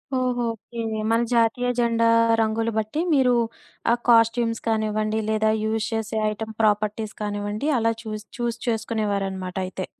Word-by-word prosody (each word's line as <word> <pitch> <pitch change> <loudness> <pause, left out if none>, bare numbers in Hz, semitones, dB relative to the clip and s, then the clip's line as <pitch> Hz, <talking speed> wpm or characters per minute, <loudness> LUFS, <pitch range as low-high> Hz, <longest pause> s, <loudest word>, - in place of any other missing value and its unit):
ఓహో! 250 -1 0
ఓకే. 230 +2 -11 0.3
మన 230 - +3
జాతీయ 235 +1 +2
జెండా 230 -1 +2 0.3
రంగులు 225 +1 0
బట్టి, 220 +8 -1
మీరు 260 -3 +4 0.6
ఆ - - +5 0.2
కాస్ట్యూమ్స్ 230 0 +4
కానివ్వండి, 215 0 0
లేదా 220 0 +2
యూజ్ 220 0 0
చేసే 220 0 -2
ఐటెమ్ 220 +1 -6
ప్రాపర్టీస్ 210 0 +1
కానివ్వండి, 205 +6 -2
అలా 230 0 +2
చూస్, 215 -1 -6
చూజ్ 235 -1 -2
చేసుకునేవారనమాటయితే. 195 -4 -2
220 Hz, 125 wpm, -24 LUFS, 210-230 Hz, 0.6 s, ఆ